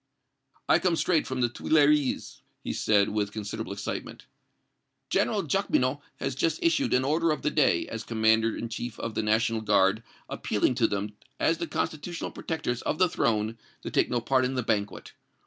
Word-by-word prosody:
"I - - +5
come 180 -3 +1
straight 165 -1 +1
from 130 -1 -2
the 120 - +4
Tuileries," 150 +2 +1 0.2
he - - -3
said, 100 -2 +2
with 105 -1 -1
considerable 110 -1 -5
excitement. 100 0 -6 0.9
"General - - +1
Jacqueminot 130 +3 0
has 135 -1 -3
just 155 +4 0
issued 295 - +2
an 130 +1 +2
order 165 +4 +2
of 155 - -1
the 150 - +1
day, 130 - +2
as 115 -1 -5
commander 110 0 +2
in 115 - -4
chief 115 0 -6
of 115 - -4
the - - -1
National 110 +1 +1
Guard, 105 0 +3 0.3
appealing 105 +4 0
to 120 -2 +2
them 100 +1 -3 0.3
as 165 0 +2
the 170 - -2
constitutional 165 +3 -3
protectors 145 -7 -3
of 155 - -2
the 185 - +4
Throne 110 -4 0 0.2
to - - -5
take - - +2
no 120 -1 0
part 130 +2 +2
in 130 +1 -1
the 125 - -1
banquet. 105 -2 -2
120 Hz, 180 wpm, -27 LUFS, 110-150 Hz, 0.9 s, I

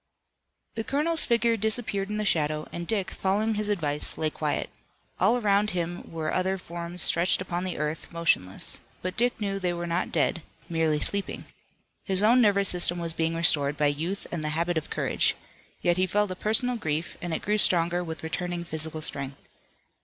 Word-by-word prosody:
The 225 - -3
colonel's 305 +6 0
figure 235 -1 +3
disappeared 215 -2 -1
in 210 - -2
the 215 - -1
shadow, 155 -4 +1
and 170 0 -5
Dick, 200 -4 0
following 210 +3 0
his 210 0 -2
advice, 150 -7 +1
lay 155 -1 0
quiet. 150 -1 -2 0.5
All 210 +7 +4
around 210 -2 +2
him 175 -2 -3
were 160 -1 -3
other 190 +1 +1
forms 170 -1 -3
stretched 175 +2 +4
upon 180 -1 -3
the 185 - -3
earth, 155 +1 -3
motionless. 155 - -1 0.2
But 185 0 -3
Dick 245 0 +1
knew 195 -2 -2
they 180 -2 0
were 175 0 -4
not 170 +2 -1
dead, 170 - +1 0.3
merely 160 -2 +1
sleeping. 200 +5 -1 0.6
His 190 0 -1
own 240 +4 +6
nervous 200 -3 +4
system 175 0 +3
was 170 -1 -3
being 165 0 0
restored 145 -3 +2
by 145 -1 +3
youth 170 +7 -4
and 170 -3 -3
the 155 - -1
habit 170 +1 0
of 160 -1 -2
courage. - - +1 0.5
Yet 175 0 +3
he 185 0 +2
felt 205 0 +1
a - - -3
personal 230 +5 +2
grief, 160 -5 -2
and 175 - -4
it 160 - -2
grew 210 +1 +1
stronger 175 -1 +4
with 160 -2 -6
returning 175 +2 -3
physical 160 -1 -4
strength. 135 -2 -3
175 Hz, 185 wpm, -27 LUFS, 160-205 Hz, 0.6 s, own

